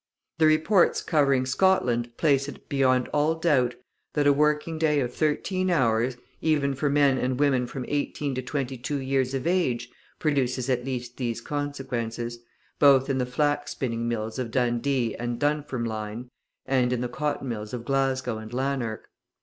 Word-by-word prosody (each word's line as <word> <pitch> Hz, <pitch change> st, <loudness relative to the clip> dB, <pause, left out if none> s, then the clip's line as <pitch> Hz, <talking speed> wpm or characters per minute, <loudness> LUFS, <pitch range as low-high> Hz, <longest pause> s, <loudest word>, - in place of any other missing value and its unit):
The 160 Hz, -, +6 dB
reports 160 Hz, +5 st, +3 dB
covering 140 Hz, -5 st, +2 dB
Scotland 125 Hz, -6 st, +1 dB
place 140 Hz, -3 st, +2 dB
it 145 Hz, -, -10 dB
beyond 130 Hz, -2 st, +2 dB
all 150 Hz, +2 st, +2 dB
doubt, 140 Hz, -7 st, +2 dB, 0.4 s
that 145 Hz, -1 st, +2 dB
a 145 Hz, -, +6 dB
working 150 Hz, +2 st, +1 dB
day 150 Hz, -2 st, +3 dB
of 125 Hz, -2 st, -2 dB
thirteen 185 Hz, +5 st, 0 dB
hours, 125 Hz, -5 st, +2 dB, 0.2 s
even 145 Hz, -3 st, +2 dB
for 140 Hz, +2 st, 0 dB
men 140 Hz, -2 st, +3 dB
and 130 Hz, 0 st, -1 dB
women 135 Hz, -4 st, +2 dB
from 125 Hz, 0 st, -5 dB
eighteen 145 Hz, -1 st, -2 dB
to 130 Hz, -, -2 dB
twenty 130 Hz, -1 st, -3 dB
two 145 Hz, +4 st, -2 dB
years 135 Hz, 0 st, 0 dB
of 130 Hz, -, -3 dB
age, 130 Hz, -10 st, 0 dB, 0.3 s
produces 130 Hz, -4 st, 0 dB
at 125 Hz, -1 st, 0 dB
least 125 Hz, -2 st, -5 dB
these 120 Hz, -3 st, -2 dB
consequences, 120 Hz, -4 st, -4 dB, 0.4 s
both 135 Hz, -1 st, +5 dB
in 130 Hz, -, 0 dB
the 125 Hz, -, 0 dB
flax 145 Hz, +2 st, 0 dB
spinning 115 Hz, -2 st, -2 dB
mills 115 Hz, +1 st, -3 dB
of 125 Hz, -2 st, -2 dB
Dundee 120 Hz, 0 st, 0 dB
and 120 Hz, 0 st, -3 dB
Dunfermline, 125 Hz, -6 st, -2 dB, 0.3 s
and 125 Hz, -2 st, +2 dB
in 125 Hz, -1 st, 0 dB
the 125 Hz, -, -1 dB
cotton 140 Hz, +2 st, -3 dB
mills 105 Hz, -3 st, -4 dB
of 120 Hz, -2 st, -5 dB
Glasgow 130 Hz, -3 st, 0 dB
and 110 Hz, 0 st, -9 dB
Lanark. 130 Hz, -3 st, -2 dB
130 Hz, 165 wpm, -26 LUFS, 120-145 Hz, 0.4 s, The